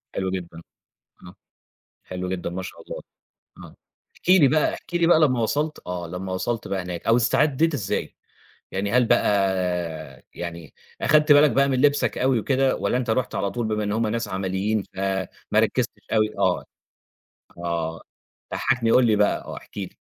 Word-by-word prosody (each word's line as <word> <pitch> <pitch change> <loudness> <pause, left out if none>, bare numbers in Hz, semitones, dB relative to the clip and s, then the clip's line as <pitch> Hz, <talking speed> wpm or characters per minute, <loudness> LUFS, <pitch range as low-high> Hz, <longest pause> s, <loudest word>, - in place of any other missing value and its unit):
حلو 95 -1 -1
جدًا، 85 -3 -6 0.7
آه 90 - -13 0.7
حلو 90 0 -5
جدًا 90 -2 -3
ما 95 +2 -4
شاء 95 - -9
الله، - - -8 0.6
آه، - - -12 0.4
احكِ - - -8
لي 180 -6 +7
بقى 150 +3 +2
احكِ - - -11
لي 170 -1 +3
بقى 165 -2 +6
لما 130 -6 +3
وصَلت 150 +7 -1
آه 90 -1 -4
لما 95 +2 -5
وصَلت 115 +5 -2
بقى 95 -1 -2
هناك 90 -1 -6
أو 115 - +5
استعدّيت 150 +6 +2
إزاي؟ 105 -9 -3 0.6
يعني 100 +2 -2
هل 125 0 +4
بقى - - +3 1.1
يعني 85 -3 -7 0.3
أخَدت 155 0 +5
بالك 145 0 +6
بقى 140 +4 +3
من 130 -2 +1
لِبسك 145 0 +2
أوي 130 -2 +2
وكده 135 +3 +1
والّا - - 0
أنت 125 -2 -1
رُحت 125 +2 0
على 100 - -1
طول 120 0 -2
بما 105 -1 -1
إن 105 - -2
هُم 110 +1 +1
ناس 115 +2 -2
عمليين 95 +3 -1
فما 95 -1 -1 0.3
ركّزتش - - +1
أوي، 110 -1 +3
آه، 95 -2 +1 0.9
آه، 85 -1 -3 0.5
ضحّكني، 120 -4 +1
قُل 125 - +5
لي 110 -2 +3
بقى 105 0 +2
آه - - -7
احكِ - - -14
لي؟ - - -6
110 Hz, 175 wpm, -24 LUFS, 95-130 Hz, 1.1 s, لي